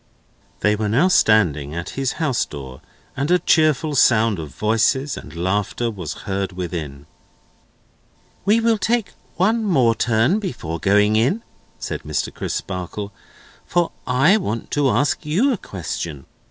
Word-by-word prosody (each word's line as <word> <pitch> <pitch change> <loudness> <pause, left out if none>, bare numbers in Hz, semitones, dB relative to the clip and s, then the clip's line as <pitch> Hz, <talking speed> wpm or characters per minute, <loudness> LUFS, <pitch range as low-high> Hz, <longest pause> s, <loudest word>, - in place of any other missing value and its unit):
They 105 0 +3
were 105 0 -2
now 140 - +3
standing 80 - +3
at 85 +1 -4
his 135 -2 -2
house 150 -8 0
door, 65 -3 -9 0.3
and 140 +3 -2
a 180 - +5
cheerful 155 -3 +2
sound 115 -6 +3
of 80 -2 -6
voices 115 - +1
and - - -10
laughter 100 +6 -1
was 90 -8 -7
heard 95 -1 -2
within. 80 -6 -5 1.4
"We 210 +4 +3
will 225 -1 +2
take 230 0 0 0.2
one 220 +7 +2
more 130 - +3
turn 115 - +2
before 85 - -5
going 105 +2 +3
in," 140 - +1 0.3
said - - -5
Mr. - - -3
Crisparkle, 100 +2 -5 0.5
"for 175 -1 +1 0.2
I 135 +11 +4
want 115 - -4
to 145 -2 +2
ask 145 +4 +1
you 205 - +2
a - - -2
question. 80 - -6
115 Hz, 140 wpm, -21 LUFS, 95-155 Hz, 1.4 s, a